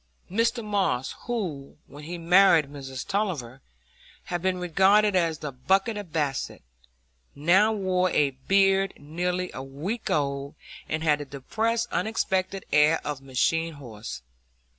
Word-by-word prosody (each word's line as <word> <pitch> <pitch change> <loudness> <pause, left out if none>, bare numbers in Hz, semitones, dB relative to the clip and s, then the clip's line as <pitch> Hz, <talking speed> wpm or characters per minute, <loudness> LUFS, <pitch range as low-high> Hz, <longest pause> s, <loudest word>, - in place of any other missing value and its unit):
Mr 230 +2 +1
Moss, 195 -11 0
who, 175 - -4
when 145 +2 -12
he 175 +2 -5
married 170 -3 +5
Miss 135 -2 -7
Tulliver, 155 - -2 0.6
had 175 -1 -3
been 185 0 0
regarded 195 +4 +3
as 165 -3 +2
the 150 -1 -5
buck 190 - +1
of 205 -6 -5
Basset, 145 - -2 0.7
now 185 +9 +4
wore 185 -3 +1
a 145 -4 +2
beard 195 +8 +2
nearly 180 +5 -3
a - - -6
week 150 - -5
old, 140 -1 -1 0.3
and 155 +1 -2
had 150 -2 +3
the 145 - -5
depressed, 220 - -1
unexpectant 190 -3 -1
air 150 +2 +5
of 145 -2 -3
a - - -22
machine 165 +5 0
horse. 110 - -8
170 Hz, 140 wpm, -26 LUFS, 140-195 Hz, 0.7 s, married